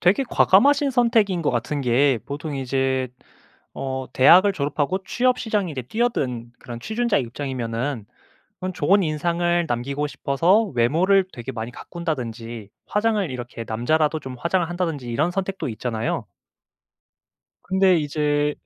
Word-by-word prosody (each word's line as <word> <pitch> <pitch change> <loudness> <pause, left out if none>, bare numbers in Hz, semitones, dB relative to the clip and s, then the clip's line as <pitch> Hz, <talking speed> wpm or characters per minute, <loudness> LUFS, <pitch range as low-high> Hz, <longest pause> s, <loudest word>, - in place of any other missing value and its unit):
되게 200 +10 +3
과감하신 280 +8 +4
선택인 225 -8 +2
것 - - +1
같은 140 +4 -2
게 130 0 +3
보통 145 +1 -5
이제 130 0 0 0.7
어 130 -1 -4
대학을 180 +9 +6
졸업하고 145 +3 -1
취업 250 +1 +1
시장에 210 -6 -1
이제 130 - -4
뛰어든 130 - -2
그런 120 -1 -8
취준자의 225 - 0
입장이면은 120 -1 -4 0.6
그런 185 0 -4
좋은 185 +4 +3
인상을 170 +2 0
남기고 140 +4 -2
싶어서 165 +10 +2
외모를 175 +11 +3
되게 120 +2 -6
많이 115 -1 -5
가꾼다든지 120 - -5 0.2
화장을 210 -5 +1
이렇게 120 -2 -6
남자라도 150 +8 +1
좀 130 -3 -8
화장을 170 0 0
한다든지 165 -8 -3
이런 150 +9 0
선택도 195 -2 -3
있잖아요. 115 0 -3 1.4
근데 190 -1 +3
이제 150 -1 0
150 Hz, 330 characters per minute, -23 LUFS, 125-185 Hz, 1.4 s, 대학을